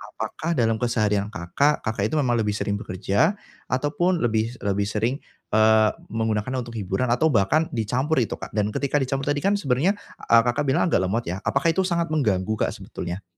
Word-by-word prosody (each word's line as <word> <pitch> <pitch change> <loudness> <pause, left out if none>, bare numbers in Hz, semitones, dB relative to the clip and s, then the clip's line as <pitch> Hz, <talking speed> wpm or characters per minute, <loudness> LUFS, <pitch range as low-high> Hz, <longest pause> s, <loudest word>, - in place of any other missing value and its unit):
apakah 125 +9 -3
dalam 115 -5 +1
keseharian 110 -4 0
Kakak, 110 +12 +1
Kakak 110 -2 -1
itu - - +2
memang 120 -4 +1
lebih 105 -2 0
sering 100 0 -1
bekerja 100 - 0 0.3
ataupun 150 +7 0
lebih 110 0 0
lebih 100 0 0
sering, 115 +6 -1 0.3
eee, 110 0 +5 0.2
menggunakannya 110 +3 -1
untuk 120 0 -10
hiburan 100 +4 -1
atau 125 +7 +3
bahkan 135 +10 +3
dicampur 125 +7 0
itu 115 - -2
Kak? - - -8
Dan 105 -1 +1
ketika 140 +5 0
dicampur 135 +1 -2
tadi 145 0 0
kan 200 +1 +3
sebenernya, 150 +5 +1 0.3
eee, 115 0 +7
Kakak 120 +4 +1
bilang 135 - +2
agak 160 - +2
lemot 110 +6 -1
ya? 95 +4 -3
Apakah 140 +4 +2
itu 190 - +1
sangat 170 -2 0
mengganggu 110 -8 +1
Kak - - 0
sebetulnya? 95 -2 -6
115 Hz, 185 wpm, -24 LUFS, 105-140 Hz, 0.3 s, eee